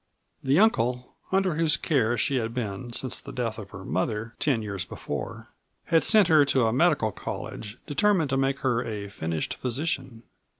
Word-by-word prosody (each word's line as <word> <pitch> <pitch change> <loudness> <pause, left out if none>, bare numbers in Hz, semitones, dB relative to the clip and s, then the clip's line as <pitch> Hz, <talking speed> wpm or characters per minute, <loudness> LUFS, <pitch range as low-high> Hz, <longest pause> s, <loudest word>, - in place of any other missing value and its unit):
The 135 +2 +3
uncle 125 - +2 0.2
(under 190 -2 +2
whose 165 -1 +3
care 120 -6 +1
she 135 +4 +1
had 115 0 -2
been 120 0 -4
since 130 +2 0
the - - -10
death 115 -3 -3
of 100 -2 -9
her 95 -1 -10
mother, 110 +4 -2
ten 130 -7 +1
years 100 -4 -3
before) - - -6 0.4
had 165 -1 +3
sent 215 -5 +5
her 155 -3 +6
to 135 -3 +2
a 110 - +1
medical 140 -6 +3
college, 105 +3 -6
determined 175 -2 +2
to - - +2
make 135 +1 0
her 120 -2 +1
a 105 -4 -5
finished 80 -4 -3
physician. 130 -2 -3
125 Hz, 175 wpm, -26 LUFS, 110-150 Hz, 0.4 s, her